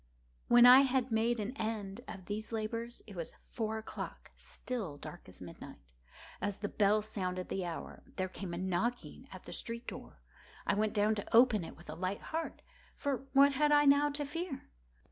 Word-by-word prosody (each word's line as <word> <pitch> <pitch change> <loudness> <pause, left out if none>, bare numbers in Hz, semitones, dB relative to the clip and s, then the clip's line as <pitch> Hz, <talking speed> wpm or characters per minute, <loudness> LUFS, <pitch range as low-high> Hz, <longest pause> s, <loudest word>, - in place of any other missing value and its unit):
When 240 0 +8
I 250 +1 +11
had 260 -2 +2
made 230 +1 +2
an 215 +5 -3
end 220 -1 -3
of 195 -4 -8
these 215 +2 -5
labors, 230 +2 -3
it 205 - -11
was 170 -2 -6
four 220 -1 -3
o'clock—still 220 - -6
dark - - -10
as - - -11
midnight. 60 0 -11 0.5
As 205 -1 -2
the 205 - -3
bell 210 +1 +3
sounded 185 -3 -3
the 190 -2 -2
hour, 165 - -6
there 185 - -1
came 185 0 -6
a - - -5
knocking 190 +7 -2
at - - -10
the - - -8
street 235 0 -5
door. - - -9 0.4
I - - +2
went 215 +2 0
down 210 +1 +3
to 210 +1 -2
open 235 -6 +6
it - - -9
with 170 - -15
a 155 - -5
light 185 +4 -3
heart,—for 300 - -4
what 280 +1 +7
had 295 +2 +2
I 295 0 +6
now 285 +1 +5
to 290 0 -1
fear? 330 - -5
220 Hz, 185 wpm, -33 LUFS, 195-255 Hz, 0.5 s, I